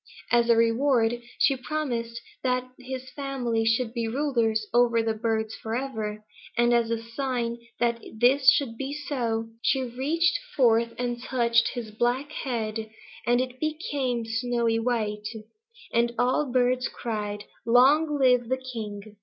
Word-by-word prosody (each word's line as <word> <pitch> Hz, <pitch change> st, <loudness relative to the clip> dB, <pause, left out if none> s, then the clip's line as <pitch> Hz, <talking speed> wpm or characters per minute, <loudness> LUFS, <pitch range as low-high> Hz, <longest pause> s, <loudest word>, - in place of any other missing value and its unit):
As 235 Hz, 0 st, +4 dB
a 235 Hz, -, +7 dB
reward 230 Hz, 0 st, +2 dB, 0.2 s
she 275 Hz, -, +4 dB
promised 245 Hz, -5 st, -3 dB, 0.2 s
that 250 Hz, -1 st, 0 dB
his 260 Hz, 0 st, -7 dB
family 255 Hz, -5 st, -2 dB
should 225 Hz, +1 st, +1 dB
be 235 Hz, -2 st, -1 dB
rulers 230 Hz, -4 st, 0 dB
over 235 Hz, -1 st, +4 dB
the 225 Hz, 0 st, 0 dB
birds 220 Hz, 0 st, -1 dB
forever, 220 Hz, -3 st, -4 dB, 0.3 s
and 240 Hz, 0 st, +4 dB
as 235 Hz, -1 st, +2 dB
a 230 Hz, -, 0 dB
sign 235 Hz, -1 st, -2 dB, 0.2 s
that 235 Hz, -1 st, +1 dB, 0.2 s
this 260 Hz, +3 st, +5 dB
should 240 Hz, -6 st, +2 dB
be 275 Hz, +1 st, -3 dB
so, 235 Hz, -7 st, -2 dB
she 265 Hz, +2 st, +2 dB
reached 315 Hz, +8 st, +1 dB, 0.2 s
forth 230 Hz, -3 st, +3 dB
and 240 Hz, -1 st, -2 dB
touched 235 Hz, -2 st, +2 dB
his 230 Hz, -3 st, -5 dB
black 245 Hz, +6 st, 0 dB
head, 220 Hz, -6 st, -3 dB, 0.4 s
and 240 Hz, 0 st, +4 dB
it 255 Hz, 0 st, -3 dB
became 285 Hz, -6 st, -2 dB
snowy 230 Hz, 0 st, 0 dB
white, 215 Hz, -3 st, -1 dB, 0.7 s
and 235 Hz, 0 st, +2 dB
all 255 Hz, +4 st, +2 dB
the -, -, -6 dB
birds 250 Hz, 0 st, +2 dB
cried 210 Hz, -3 st, -4 dB, 0.2 s
'Long 290 Hz, +6 st, +5 dB
live 250 Hz, -3 st, +3 dB
the 260 Hz, -, +1 dB
king!' 215 Hz, -5 st, -7 dB
240 Hz, 145 wpm, -26 LUFS, 225-260 Hz, 0.7 s, a